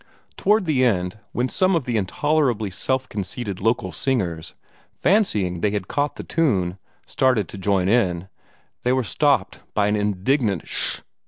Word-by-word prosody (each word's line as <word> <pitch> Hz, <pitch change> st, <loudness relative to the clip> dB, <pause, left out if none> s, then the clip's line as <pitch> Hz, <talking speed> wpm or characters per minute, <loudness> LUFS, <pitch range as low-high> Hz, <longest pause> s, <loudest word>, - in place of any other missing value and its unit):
Toward 210 Hz, 0 st, +2 dB
the 145 Hz, -6 st, +2 dB
end, 95 Hz, -4 st, 0 dB
when 125 Hz, +1 st, 0 dB
some 185 Hz, +6 st, +2 dB
of 165 Hz, -, +1 dB
the 120 Hz, -1 st, -2 dB
intolerably 120 Hz, -, 0 dB
self 130 Hz, +7 st, -1 dB
conceited 100 Hz, -1 st, -5 dB
local 115 Hz, -3 st, 0 dB
singers, 85 Hz, -, -2 dB, 0.4 s
fancying 105 Hz, -, +2 dB
they 105 Hz, -, +2 dB
had 100 Hz, -3 st, -3 dB
caught 145 Hz, 0 st, -1 dB
the -, -, -7 dB
tune, 95 Hz, -, 0 dB, 0.3 s
started 125 Hz, -8 st, +1 dB
to -, -, -8 dB
join 95 Hz, -1 st, +1 dB
in, 95 Hz, -5 st, +1 dB, 0.5 s
they 125 Hz, -, +1 dB
were 130 Hz, 0 st, +1 dB
stopped 135 Hz, -3 st, +1 dB, 0.2 s
by 105 Hz, -, +3 dB
an 105 Hz, +1 st, +2 dB
indignant 105 Hz, -, 0 dB
"sh -, -, 0 dB
h!" -, -, -17 dB
110 Hz, 160 wpm, -22 LUFS, 95-135 Hz, 0.5 s, by